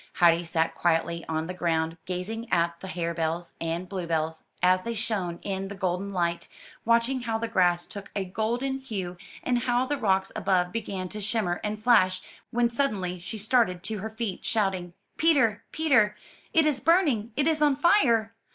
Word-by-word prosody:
Heidi 170 0 +4
sat 165 -1 0
quietly 170 0 0
on 160 0 -1
the 180 - -5
ground, 165 -2 0
gazing 220 +6 -4
at 170 0 +1
the 190 - -8
hare 170 -2 -2
bells 165 +1 -2
and 165 +2 -2
bluebells, 165 -4 -2 0.2
as 185 +1 +5
they 230 +4 -4
shone 200 -6 -2
in 195 -1 -3
the 200 - -7
golden 190 0 -2
light, 170 -2 -1 0.4
watching 235 +3 +3
how 225 -2 -1
the 230 +1 -2
grass 175 -4 +2
took 200 -1 -9
a 195 -2 -1
golden 240 +8 -1
hue, 195 -9 -5 0.3
and 245 -1 +1
how 245 +1 +1
the 290 +2 -1
rocks 195 -4 +1
above 180 -2 +1
began 200 -4 -3
to 210 +2 -6
shimmer 200 -4 -1
and 210 0 -3
flash, 185 -6 +4 0.3
when 240 0 +1
suddenly 200 -9 -1
she 190 +6 -6
started 210 -5 +2
to 215 +1 -3
her 220 +3 -4
feet, 220 -4 -4
shouting, 190 -5 0 0.3
'Teter, 265 -10 +3
Peter! 255 -10 +3 0.3
it 320 -1 +4
is 295 -4 +2
burning, 285 - +2
it 285 - +1
is 315 -1 +2
on 295 -2 +4
fire! 260 - +3
200 Hz, 180 wpm, -27 LUFS, 175-235 Hz, 0.4 s, as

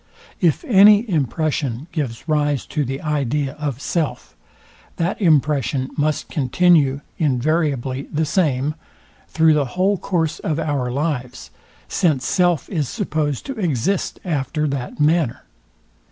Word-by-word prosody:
If 170 -5 +1
any 210 +1 +6
impression 145 - -1
gives 140 -6 -4
rise 145 -3 +1
to 150 - -2
the 135 +1 -4
idea 145 -2 -1
of 140 -4 -3
self, 150 -4 -3 0.6
that 170 +5 -2
impression 145 - +2
must 150 0 0
continue 145 -1 +2 0.2
invariably 140 -2 0
the 155 +1 0
same, 150 -4 +1 0.5
through 160 -1 +3
the 150 -2 +2
whole 195 +1 +2
course 165 -5 -1
of 155 -2 -2
our 145 -6 -1
lives; 130 -3 -3 0.4
since 155 -9 +1
self 175 -5 +1
is 155 -8 -2
supposed 155 - -2
to 270 -4 -6
exist 175 - -1
after 150 -1 -1
that 135 -1 -5
manner. 150 -4 +1
150 Hz, 125 wpm, -20 LUFS, 135-165 Hz, 0.6 s, any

